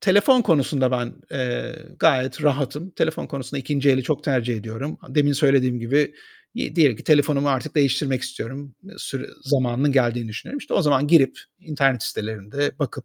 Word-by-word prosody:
telefon 205 Hz, +6 st, +4 dB
konusunda 140 Hz, -, +2 dB
ben, 120 Hz, -2 st, -2 dB, 0.2 s
eee, 130 Hz, +5 st, -4 dB, 0.2 s
gayet 135 Hz, -2 st, +2 dB
rahatım. 145 Hz, +4 st, -1 dB
Telefon 160 Hz, -2 st, -2 dB
konusunda 140 Hz, 0 st, -6 dB
2. 140 Hz, +1 st, +1 dB
eli 130 Hz, 0 st, +2 dB
çok 150 Hz, +3 st, -2 dB
tercih 125 Hz, -4 st, 0 dB
ediyorum. 115 Hz, +7 st, -6 dB
A -, -, -12 dB
demin 145 Hz, -1 st, +3 dB
söylediğim 135 Hz, -4 st, +2 dB
gibi, 145 Hz, +5 st, +1 dB, 0.4 s
iii, 245 Hz, -, -4 dB
diyelim 145 Hz, -9 st, +4 dB
ki -, -, -13 dB
telefonumu 145 Hz, -2 st, +3 dB
artık 140 Hz, +2 st, -1 dB
değiştirmek 140 Hz, -2 st, +1 dB
istiyorum. 135 Hz, +2 st, -7 dB, 0.2 s
Sü 135 Hz, 0 st, -6 dB
zamanının 135 Hz, 0 st, +1 dB
geldiğini 120 Hz, -3 st, +1 dB
düşünüyorum. 115 Hz, -, -6 dB
İşte, -, -, -6 dB
o 195 Hz, -, +3 dB
zaman 145 Hz, -2 st, +2 dB
girip 145 Hz, -4 st, +4 dB, 0.2 s
internet 135 Hz, -6 st, 0 dB
sitelerinde 110 Hz, +8 st, -3 dB
bakıp, 135 Hz, -2 st, -4 dB
140 Hz, 160 wpm, -22 LUFS, 125-150 Hz, 0.4 s, telefon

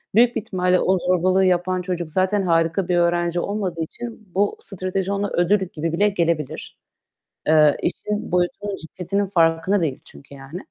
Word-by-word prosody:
büyük 240 Hz, +1 st, +5 dB
bir -, -, 0 dB
ihtimalle 180 Hz, -2 st, +1 dB
o 190 Hz, +1 st, +2 dB
zorbalığı 185 Hz, +1 st, +2 dB
yapan 185 Hz, 0 st, +1 dB
çocuk 175 Hz, -3 st, -3 dB
zaten 190 Hz, +4 st, +1 dB
harika 165 Hz, +1 st, +1 dB
bir 180 Hz, -, +1 dB
öğrenci 175 Hz, 0 st, +1 dB
olmadığı 185 Hz, -3 st, -3 dB
için 225 Hz, +4 st, -7 dB
bu 200 Hz, +1 st, +1 dB
strateji 190 Hz, 0 st, -3 dB
ona 200 Hz, 0 st, -1 dB
ödül 180 Hz, +4 st, +2 dB
gibi 165 Hz, +1 st, -3 dB
bile 205 Hz, +5 st, +3 dB
gelebilir. 170 Hz, -6 st, -2 dB, 0.7 s
Eee, 155 Hz, -2 st, +5 dB
işin 210 Hz, -3 st, -3 dB
boyutunun, 180 Hz, +3 st, -1 dB
ciddiyetinin 185 Hz, +4 st, -3 dB
farkında 170 Hz, +2 st, +2 dB
değil 145 Hz, -5 st, -1 dB
çünkü 140 Hz, -, -15 dB
yani. 135 Hz, +6 st, -8 dB
180 Hz, 155 wpm, -22 LUFS, 165-195 Hz, 0.7 s, büyük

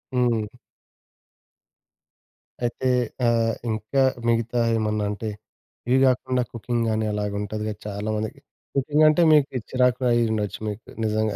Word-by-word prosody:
హ్మ్. 120 Hz, -4 st, +2 dB, 2.2 s
అయితే 120 Hz, +2 st, -1 dB, 0.4 s
ఆహ్, 115 Hz, -1 st, +2 dB, 0.2 s
ఇంకా 110 Hz, +5 st, 0 dB, 0.3 s
మిగతా 115 Hz, +1 st, +1 dB, 0.2 s
ఏమన్నా 105 Hz, -1 st, 0 dB
అంటే 110 Hz, +2 st, -4 dB, 0.6 s
ఇవి 130 Hz, -, +4 dB
కాకుండా 130 Hz, 0 st, +1 dB
కుకింగ్ 115 Hz, +1 st, -2 dB
గాని 110 Hz, 0 st, 0 dB
అలాగా 105 Hz, -1 st, -2 dB
ఉంటది 105 Hz, +1 st, -4 dB
కదా! 105 Hz, -, -4 dB
చాలామందికి 105 Hz, +1 st, -3 dB, 0.4 s
కుకింగ్ 150 Hz, +3 st, +3 dB
అంటే 155 Hz, +3 st, +3 dB
మీకు 140 Hz, -3 st, +3 dB
చిరాకు 125 Hz, -1 st, +3 dB
కూడా 125 Hz, -2 st, +1 dB
అయ్యుండొచ్చు 110 Hz, -3 st, 0 dB
మీకు 110 Hz, +2 st, -7 dB, 0.2 s
నిజంగా 110 Hz, -1 st, 0 dB
115 Hz, 120 wpm, -24 LUFS, 105-125 Hz, 2.2 s, ఇవి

